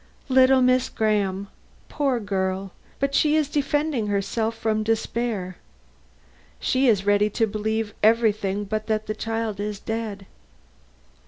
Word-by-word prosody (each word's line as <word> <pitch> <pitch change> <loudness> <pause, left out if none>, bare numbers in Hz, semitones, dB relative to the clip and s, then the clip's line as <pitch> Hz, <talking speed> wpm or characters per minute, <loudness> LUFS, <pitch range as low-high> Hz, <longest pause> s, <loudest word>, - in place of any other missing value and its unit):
"Little 260 0 +5
Miss 255 0 +3
Graham? 200 -3 0 0.4
Poor 275 -4 0
girl! 190 -2 -2 0.4
she 300 +2 +3
is 305 -2 +1
but - - -20
defending 290 -4 0
herself 220 +3 -1
from 220 -1 0
despair. 220 -3 -2 1.0
She 260 +1 +1
is 200 -5 +3
ready 205 +1 +3
to 225 +2 +1
believe 220 0 -2
everything 210 -3 +2
but 215 +1 -3
that 215 -1 0
the 215 - -2
child 225 -1 -3
is 205 -1 -3
dead." 220 -3 -4
220 Hz, 130 wpm, -24 LUFS, 205-240 Hz, 1.0 s, Little